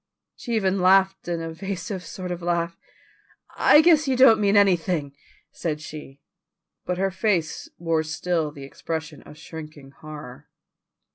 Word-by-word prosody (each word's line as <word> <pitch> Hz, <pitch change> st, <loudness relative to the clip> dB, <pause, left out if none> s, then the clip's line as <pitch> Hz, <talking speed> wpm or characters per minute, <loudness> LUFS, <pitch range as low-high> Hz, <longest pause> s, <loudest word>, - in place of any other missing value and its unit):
She 235 Hz, -2 st, -4 dB
even 195 Hz, -2 st, +1 dB
laughed 190 Hz, +1 st, +3 dB
an 170 Hz, -1 st, -2 dB
evasive 180 Hz, +3 st, -5 dB
sort 180 Hz, +1 st, -7 dB
of 175 Hz, 0 st, -4 dB
laugh. 170 Hz, -1 st, -1 dB, 0.8 s
"I 300 Hz, -, +6 dB
guess 315 Hz, -3 st, +4 dB
you 265 Hz, -, +2 dB
don't 250 Hz, -3 st, +7 dB
mean 205 Hz, 0 st, +3 dB
anything," 175 Hz, -7 st, +2 dB, 0.4 s
said 155 Hz, -3 st, -3 dB
she, 150 Hz, -2 st, -10 dB, 0.7 s
but 180 Hz, -, -1 dB
her 195 Hz, +1 st, 0 dB
face 185 Hz, -5 st, -1 dB
wore 165 Hz, -2 st, 0 dB
still 160 Hz, 0 st, -2 dB
the 140 Hz, -2 st, -11 dB
expression 155 Hz, +1 st, -6 dB
of 150 Hz, -, -14 dB
shrinking 155 Hz, -4 st, -10 dB
horror. 150 Hz, -3 st, -11 dB
170 Hz, 140 wpm, -24 LUFS, 155-195 Hz, 0.8 s, don't